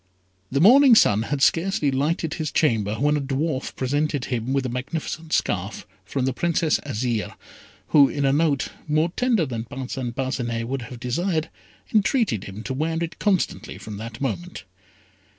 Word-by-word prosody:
The 140 - +1
morning 250 - +8
sun 105 - +5
had 135 +4 -1
scarcely 165 -4 +2
lighted 155 +4 0
his 155 -4 -3
chamber, 110 -8 +1
when 145 +5 +2
a 145 - 0
dwarf 140 +1 -2
presented 145 +1 -1
him 120 0 -2
with 135 -1 0
a - - -1
magnificent 155 +5 -4
scarf 95 - -1 0.2
from 130 +7 -2
the 130 - 0
Princess 165 +2 +1
Azire, 120 -5 -2 0.5
who 140 -3 +6
in 140 -1 -1
a 135 - +3
note, 145 -2 +1 0.2
more 155 +3 +1
tender 240 -9 +2
than 115 -4 -4
Parcin 130 -1 -5
Parcinet 120 -3 -2
would 135 +1 -3
have 125 - -9
desired, 160 +6 -1 0.4
entreated 210 - +2
him 100 +3 -8
to 130 - -3
wear 160 +4 -1
it 165 -1 -6
constantly 195 -4 0
from 105 -2 -8
that 115 +2 -7
moment. 105 -11 -4
140 Hz, 165 wpm, -23 LUFS, 120-160 Hz, 0.5 s, morning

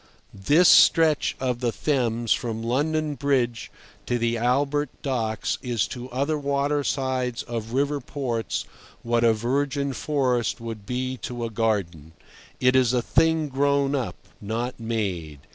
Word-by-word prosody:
This 145 - +4
stretch 160 -3 +5
of 125 -2 -1
the 120 -1 0
Thames 120 -5 0
from 115 -1 -3
London 150 +5 0
Bridge 130 -5 0 0.4
to 120 - +1
the 115 0 0
Albert 140 +5 +1
Docks 115 -6 -1
is 120 -4 0
to 125 0 -7
other 140 +5 -1
watersides 140 -3 -1
of 115 -1 -5
river 140 +2 +1
ports 120 -3 -3 0.4
what 120 0 +1
a 115 - +6
virgin 140 +5 -1
forest 125 -4 0
would 115 -3 -7
be 130 +1 -2
to 120 -1 -5
a 115 - -5
garden. 95 -9 -1 0.5
It 125 0 +3
is 130 -2 +4
a 125 -2 +1
thing 160 +1 +2
grown 140 0 +1
up, 130 -4 -2 0.3
not 115 +5 -3
made. 95 -10 -3
125 Hz, 140 wpm, -25 LUFS, 115-140 Hz, 0.5 s, a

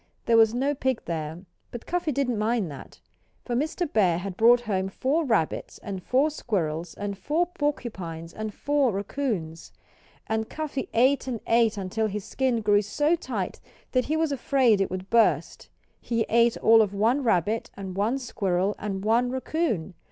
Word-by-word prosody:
There 230 - +3
was 225 -1 +6
no 265 +5 0
pig 260 -3 -1
there, 160 +1 -4 0.3
but 240 - -8
Cuffy 350 -3 -1
didn't 250 -5 0
mind 215 -5 0
that. 140 - -11 0.5
For 245 - -3
Mr. 315 +7 -1
Bear 185 -6 +3
had 185 +1 -5
brought 235 +3 +5
home 195 -4 -1
four 280 +11 0
rabbits, 215 - -1
and 195 -2 -5
four 270 - +2
squirrels, 170 - -3
and 205 -1 -4
four 300 - 0
porcupines, 210 - -4
and 215 0 -4
four 285 +1 +1
raccoons. 195 - -3 0.5
And 220 0 -2
Cuffy 300 -4 -4
ate 265 +4 +3
and 240 -3 -3
ate 230 -2 +3
until 200 +3 -1
his 210 -1 -5
skin 255 -4 0
grew 205 -1 +4
so 295 +11 +1
tight 340 - -4 0.3
that 255 -1 +1
he 310 +2 0
was 320 -2 +1
afraid 255 -5 +2
it 195 - 0
would 185 +1 -6
burst. 230 -1 +2 0.3
He 230 -2 -1
ate 235 +1 +4
all 225 0 +6
of 205 -2 0
one 230 +7 +2
rabbit, 215 0 +1
and 190 -2 -6
one 215 +7 +1
squirrel, 200 -6 -1
and 195 -1 -4
one 235 +3 +3
raccoon. 260 - -2
225 Hz, 170 wpm, -26 LUFS, 195-260 Hz, 0.5 s, was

